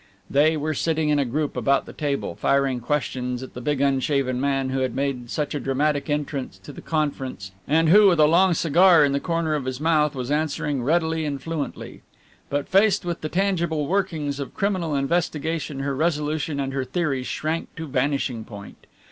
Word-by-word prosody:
They 155 +3 +4
were 155 +1 -1
sitting 160 +1 0
in 150 -1 +3
a 140 - +1
group 145 +4 -2
about 140 0 +1
the - - -10
table, 145 -3 -2
firing 135 -2 +1
questions 125 -1 -2
at 130 - -10
the 125 - -7
big 145 +1 -1
unshaven 135 -2 +1
man 135 -1 0
who 135 - -1
had 130 -2 -1
made 135 -3 -2
such 150 +2 -2
a 145 - -2
dramatic 140 +2 0
entrance 145 -7 -3
to - - -10
the - - -10
conference 135 -10 -3 0.2
and 160 +2 +3
who, 205 +4 +7
with 175 -4 +3
a 150 - +7
long 175 +3 +4
cigar 170 0 +5
in 140 - 0
the 140 - +1
corner 165 -1 -1
of 145 -4 -2
his 130 0 -3
mouth, 150 -2 +2
was 130 +1 -4
answering 150 -2 -1
readily 160 +3 +1
and 140 -3 -4
fluently. 165 -3 -5 0.5
But 145 0 -2
faced 200 0 +3
with 175 -1 -3
the 155 - -3
tangible 170 -5 0
workings 160 -5 -1
of 140 - -6
criminal 185 -6 -1
investigation 155 0 -1
her 140 0 -2
resolution 150 -1 -1
and 135 -1 -2
her 135 -1 -1
theories 135 -2 -2
shrank 160 +2 -3
to 165 - -5
vanishing 130 -3 -1
point. 100 -2 -12
145 Hz, 190 wpm, -23 LUFS, 135-160 Hz, 0.5 s, who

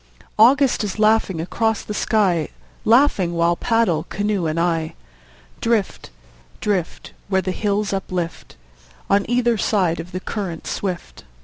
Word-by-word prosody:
August 260 +2 +5
is 205 -1 -4
laughing 215 -5 +2
across 220 +6 -1
the 210 - -5
sky, 195 -8 +1 0.4
Laughing 225 -7 +3
while 170 +1 +2
paddle, 220 -6 +1
canoe 205 -3 -1
and 155 +1 -1
I, 165 -1 0 0.6
Drift, 230 -4 -1 0.5
drift, 190 -5 -2
Where 190 -1 +1
the 185 - -1
hills 205 +1 -1
uplift 185 -3 -4 0.6
On 200 +2 +2
either 240 -2 +2
side 180 -7 +1
of 170 +2 -7
the 185 - -4
current 185 -4 -5
swift. 180 - -5
195 Hz, 130 wpm, -21 LUFS, 175-220 Hz, 0.6 s, August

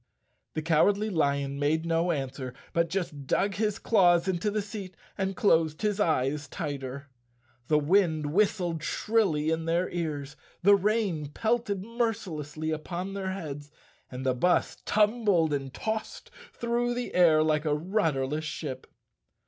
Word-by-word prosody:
The 155 - -2
Cowardly 200 +7 +3
Lion 140 -4 0
made 155 +3 +1
no 165 +1 +1
answer 135 -3 -4 0.2
but 170 0 +2
just 155 -7 -4
dug 200 +7 +1
his 210 0 0
claws 175 -6 +4
into 190 +2 0
the 210 0 -1
seat 200 -3 -8 0.2
and 195 -1 -2
closed 165 -7 +2
his 210 -1 0
eyes 150 -4 +1
tighter. 140 -4 -5 0.6
The 150 - +4
wind 155 -2 +2
whistled 180 -5 +1
shrilly 165 -5 +1
in 160 0 -1
their 170 +2 0
ears, 150 -4 -3 0.3
the 200 +2 +7
rain 200 -6 0
pelted 220 +3 -1
mercilessly 170 - -3
upon 175 +5 -4
their 195 -1 -3
heads 145 -6 -6 0.4
and 130 +1 -6
the 130 - +3
bus 175 +8 +1
tumbled 210 -7 +2
and 135 -2 -3
tossed 220 +9 -4 0.2
through 240 +1 -1
the 245 0 -4
air 160 -4 +5
like 155 0 +1
a 150 -1 +2
rudderless 155 -5 0
ship. 155 -3 -5
170 Hz, 140 wpm, -28 LUFS, 150-200 Hz, 0.6 s, the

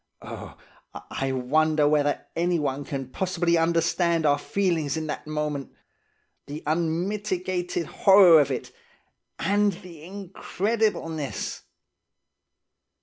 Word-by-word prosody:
Oh, - - -9 0.5
I 135 0 -2
wonder 150 +4 +2
whether 145 -1 +1
anyone 150 -5 0
can 135 -3 -5
possibly 175 -1 0
understand 165 0 +1
our 145 -1 +3
feelings 165 -6 -1
in 160 - -3
that 150 0 -5
moment? 150 -2 -3 0.7
The 145 +2 -7
unmitigated 175 +2 -1
horror 185 -3 +6
of 140 - 0
it 130 - -4 0.7
and 205 +1 +2
the 175 -4 -12
incredibleness! 190 - -3
165 Hz, 95 wpm, -25 LUFS, 150-185 Hz, 0.7 s, horror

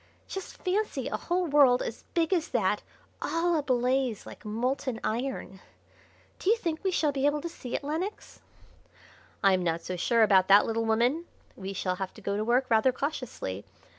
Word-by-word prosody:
Just 385 - -7
fancy 405 +3 -1
a - - -2
whole 360 +1 -1
world 280 -5 +5
as 230 - -6
big 335 +1 +2
as 335 -3 +1
that 210 -4 +1 0.4
all 340 +1 +1
ablaze 255 -4 +1
like - - -11
molten 245 +3 -2
iron! 230 -4 -3 0.8
Do 370 - 0
you 455 - +5
think 335 -6 -3
we 385 - +2
shall 315 -5 +1
be 275 0 +1
able 295 +1 +1
to 330 - -4
see 255 -7 -6
it, - - -3
Lenox?" 325 +8 -4 1.0
"I'm 190 -2 +4
not 170 -1 0
so 185 - -4
sure 230 +6 +3
about 190 -3 +5
that, 200 +1 +7
little 225 0 -1
woman. 240 +9 +2 0.3
We 195 0 -6
shall 185 -1 -2
have 190 -1 -5
to - - -11
go 200 0 -2
to 210 - 0
work 245 +4 +2
rather 230 +2 +4
cautiously. 255 - -4
255 Hz, 180 wpm, -28 LUFS, 210-315 Hz, 1.0 s, that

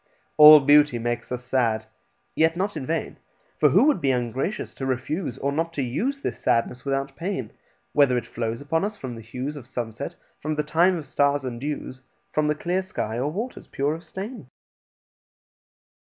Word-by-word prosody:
All 150 0 +11
beauty 145 -2 +5
makes 120 +1 -3
us 125 0 -3
sad, 115 -4 0 0.5
yet 160 +1 +3
not 195 +1 -1
in 135 -4 -5
vain: 165 0 -2 0.4
For - - +6
who - - +5
would 290 - +3
be 135 - +1
ungracious 130 - -2
to 135 - -5
refuse, 130 +3 -2
Or 140 - -1
not 165 +3 -1
to 140 - -1
use, 255 - -2
this - - -3
sadness 125 +2 0
without 135 0 -2
pain, 165 - -4 0.4
Whether 140 -4 +4
it 120 - -3
flows 115 +1 -4
upon 160 +4 0
us 205 +1 -3
from 130 -7 -6
the 115 - -8
hues 125 +6 -5
Of 130 -5 -10
sunset, 120 -4 -5 0.2
from 155 +1 -2
the 150 - 0
time 170 +4 +3
of 155 - -6
stars 140 +1 +1
and 120 -2 -5
dews, 140 -2 -5 0.3
From 155 0 +2
the 150 - +1
clear 175 +4 -1
sky, 120 - -4
or 140 +4 -1
waters 225 +9 -5
pure 140 +2 -1
of 165 +2 -8
stain? 200 +9 -7
145 Hz, 185 wpm, -25 LUFS, 125-165 Hz, 0.5 s, All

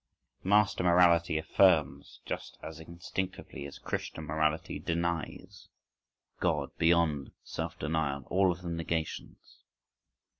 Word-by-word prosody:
Master 100 -1 +3
morality 85 -2 +5
affirms 80 0 +2
just - - -5
as 80 0 -7
instinctively 85 -1 -5
as 70 - -10
Christian 80 - -4
morality 75 +1 -1
denies 85 -1 -3 0.7
("God," - - 0
"Beyond," 80 -4 +2
"self - - -5
denial,"—all 80 +4 +1
of 90 +1 -7
them 85 -1 -3
negations). 80 -1 -4
85 Hz, 100 wpm, -31 LUFS, 80-90 Hz, 0.7 s, morality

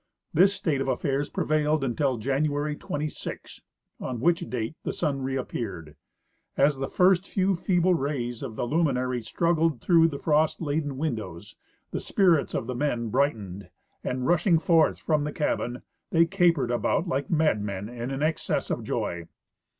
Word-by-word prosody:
This 190 +5 +6
state 160 -8 -1
of 135 - -2
affairs 140 +1 -1
prevailed 155 -1 +1
until 130 0 0
Ja'iiuary 145 +4 -1
26, 150 +1 -5 0.4
on 125 -2 -4
which 170 +7 +3
date 120 +3 -3
the - - -3
sun 145 -5 -1
reappeared. 115 - -4 0.6
As 140 0 +3
the 135 - -2
first 185 0 +3
few 195 0 +1
feeble 180 +1 +2
rays 135 -7 -2
of 125 -6 -6
the - - -2
luminary 130 -4 0
struggled 165 +4 +1
through 165 +4 +5
the 145 -4 -4
frost 155 +1 +2
laden 145 -3 -2
windows 105 - -4 0.4
the - - -2
spirits 175 -7 +2
of - - -1
the 125 - -3
men 120 -4 -1
brightened, 105 -8 -1 0.3
and, 125 0 -2
rushing 175 +2 +3
forth 165 -1 +3
from 155 -2 0
the 150 - -2
cabin, 125 -5 -2 0.3
they 165 0 +4
capered 170 -9 +2
about 120 +8 0
like 135 -2 -2
mad 155 -9 +2
men 100 -1 -4
in 120 +1 -5
an 135 +2 -2
excess 155 +1 -1
of - - -2
joy. 85 -1 -3
145 Hz, 160 wpm, -26 LUFS, 125-160 Hz, 0.6 s, This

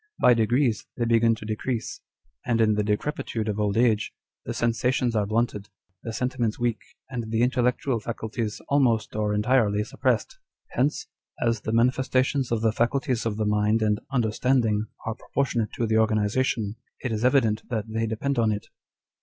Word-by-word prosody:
By 125 - +6
degrees 120 +1 +1
they 120 - 0
begin 115 0 +4
to 110 - -10
decrease; 110 +2 -3 0.4
and 115 -1 0
in 110 -1 +4
the 105 - +1
decrepitude 110 +1 -2
of 105 0 -2
old 105 0 0
age, 115 -3 +2 0.3
the - - -3
sensations 120 +1 0
are 105 -2 +1
blunted, 110 -2 -1 0.3
the 115 - -5
sentiments 120 -1 -1
weak, 120 -3 0 0.3
and 120 -3 -4
the 115 +1 +1
intellectual 125 0 +1
faculties 110 0 -4
almost 120 -8 +2
or 105 -1 0
entirely 105 -1 +2
suppressed. - - -1 0.3
Hence, 140 +4 0 0.3
as 115 -2 0
the 110 - -3
manifestations 130 +2 +1
of 115 -2 +1
the 110 -1 +3
faculties 120 +1 0
of 105 -2 -2
the 110 - 0
mind 105 +1 +2
and 105 -1 +1
understanding 115 -2 +1 0.2
are 115 - -1
proportionate 120 -2 -2
to 120 - -1
the 110 0 +2
organization, 110 0 +1 0.3
it 125 - -1
is 110 +1 -2
evident 125 -5 +3
that 110 -4 -2
they 115 +1 -1
depend 120 +4 -1
on 110 -2 +3
it." 105 0 -4
115 Hz, 165 wpm, -25 LUFS, 110-125 Hz, 0.4 s, By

